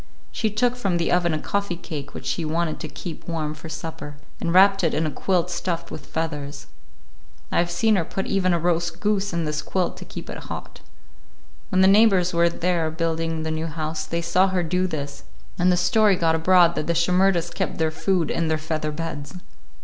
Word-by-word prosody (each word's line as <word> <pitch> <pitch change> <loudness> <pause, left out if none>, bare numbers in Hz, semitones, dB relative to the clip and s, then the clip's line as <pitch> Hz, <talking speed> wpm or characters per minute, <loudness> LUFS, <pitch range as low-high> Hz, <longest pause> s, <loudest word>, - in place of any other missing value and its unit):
She 220 - 0
took 240 +4 +1
from 195 -8 0
the 170 - 0
oven 175 -1 +2
a 155 - 0
coffee 200 +3 -2
cake 150 -4 -7
which - - -7
she 170 - -1
wanted 160 0 -1
to - - -5
keep 170 -4 -8
warm 155 -3 -2
for 155 +1 -10
supper, 155 -2 -7 0.2
and 170 - -1
wrapped 195 +2 +6
it 165 - +2
in 160 - +1
a 155 - -1
quilt 180 0 0
stuffed 170 -1 -3
with - - -8
feathers. 145 -3 -4 0.9
I - - +2
have 175 0 +1
seen 210 +6 +2
her 175 - +1
put 195 +4 -4
even 185 -2 +1
a 170 - +3
roast 170 0 0
goose 205 -1 0
in 170 -2 -1
this 150 0 -2
quilt 185 +1 -1
to - - -9
keep - - -8
it - - -7
hot. - - -8 0.9
When 185 -2 +3
the 190 - +7
neighbors 195 -3 +5
were 170 0 +4
there 170 -1 0
building 165 0 -2
the 160 - -2
new 160 +1 -2
house 155 0 -3
they 170 0 -2
saw 185 +3 +3
her 185 -2 0
do 180 +3 0
this, 145 -4 -5 0.4
and 180 +1 +4
the 180 - +2
story 200 +3 +4
got 165 -2 +2
abroad 170 +1 +5
that 155 - -3
the 170 - +1
Shimerdas 180 0 +2
kept - - -2
their 160 -1 +1
food 175 -1 0
in 165 - 0
their 160 0 +1
feather 155 -1 -3
beds. 150 -1 -5
170 Hz, 210 wpm, -23 LUFS, 160-185 Hz, 0.9 s, the